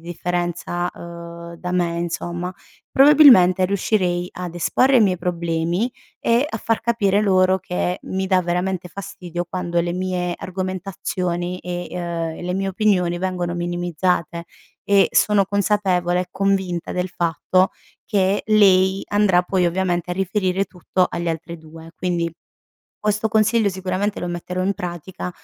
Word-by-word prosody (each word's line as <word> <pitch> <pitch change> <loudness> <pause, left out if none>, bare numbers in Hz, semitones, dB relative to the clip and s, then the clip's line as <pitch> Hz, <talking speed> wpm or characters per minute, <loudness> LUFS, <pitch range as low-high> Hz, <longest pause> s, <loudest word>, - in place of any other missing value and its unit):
differenza, 175 +1 -3
uhm, 170 0 -9
da 180 +1 -5
me 170 -2 0
insomma, 175 +1 -3 0.4
probabilmente 265 - +7
riuscirei 180 -2 0
ad 180 -2 -6
esporre 255 +10 +3
i - - +6
miei 190 -4 +3
problemi 170 +4 -1 0.3
e 235 +5 +2
a 220 - -4
far 225 +1 0
capire 215 -4 +2
loro 190 -2 +3
che 180 0 -2
mi 190 0 -2
dà 185 -1 +3
veramente 180 +1 -2
fastidio, 180 -2 -6
quando 175 -2 -1
le 175 - -2
mie 180 -1 -2
argomentazioni 185 -1 -3
e 175 0 -5
uhm, 180 - -4 0.4
e - - -8
le 180 +1 -2
mie 195 +1 -1
opinioni 185 -3 +1
vengono 180 -1 -2
minimizzate, 175 -1 -1 0.4
e 200 -1 +5
sono 205 -2 +4
consapevole 195 -3 +1
e 180 - -5
convinta 190 -3 -1
del 180 +1 -2
fatto 175 +2 +1 0.4
che 195 -1 +1
lei 195 -3 +4
andrà 205 -3 +3
poi, 180 0 +1
ovviamente, 175 0 -1
a - - -1
riferire 190 0 0
tutto 180 0 -1
alle 170 0 -3
altre 165 +1 -6
2. 160 +1 -13
Quindi, 170 -2 -1 0.7
questo 210 +1 0
consiglio 220 0 +3
sicuramente 190 +2 -2
lo 175 - -3
metterò 180 +1 -4
in 195 +2 +1
pratica, 180 +1 -6
180 Hz, 140 wpm, -21 LUFS, 175-195 Hz, 0.7 s, probabilmente